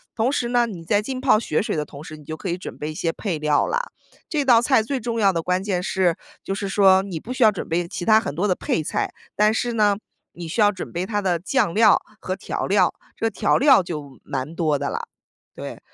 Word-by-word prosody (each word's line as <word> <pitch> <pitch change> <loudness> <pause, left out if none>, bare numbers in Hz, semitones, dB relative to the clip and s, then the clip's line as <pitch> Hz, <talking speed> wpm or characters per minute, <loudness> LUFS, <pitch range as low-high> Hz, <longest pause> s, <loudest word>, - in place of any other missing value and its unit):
同 240 +3 +1
时 245 - -1
呢 240 -1 +3
你 180 -7 -8
在 205 +4 +2
浸 255 +4 -5
泡 260 -5 +5
血 155 -8 0
水 - - -2
的 150 - -1
同 140 -1 -11
时， 155 - -9
你 150 - -14
就 155 +2 -6
可 190 - -5
以 175 - -1
准 185 - -8
备 150 +1 -4
一 - - -8
些 165 +2 -1
配 180 -2 -3
料 150 -1 +2
啦。 - - 0 0.5
这 295 -4 0
道 240 -3 +6
菜 250 -2 +3
最 265 +4 -2
重 230 0 -3
要 200 -3 +4
的 165 - -1
关 180 +2 0
键 190 -3 -1
是， 180 -3 +1 0.3
就 195 - -3
是 200 -1 -4
说 190 -1 +5
你 185 -5 -5
不 240 +10 -6
需 260 -1 +2
要 215 - +7
准 200 - -6
备 170 +1 0
其 175 - -5
他 220 -1 +6
很 220 - -4
多 190 +6 0
的 185 - +2
配 160 - -1
菜， - - -2 0.2
但 210 +1 +3
是 240 +1 -1
呢， 210 -3 +3 0.4
你 170 -1 -7
需 190 +7 -1
要 205 0 +5
准 185 -3 -7
备 175 +2 -2
它 205 +1 -1
的 180 -3 +1
酱 185 0 0
料 215 -1 +5 0.2
和 185 - -3
调 190 - -4
料， 200 +1 +3 0.2
这 225 - 0
调 215 -1 +1
料 270 -5 +6
就 150 -6 -7
蛮 140 +3 -4
多 155 -4 +1
的 - - -3
啦， - - -3 0.5
对。 - - -7
195 Hz, 275 characters per minute, -22 LUFS, 170-225 Hz, 0.5 s, 要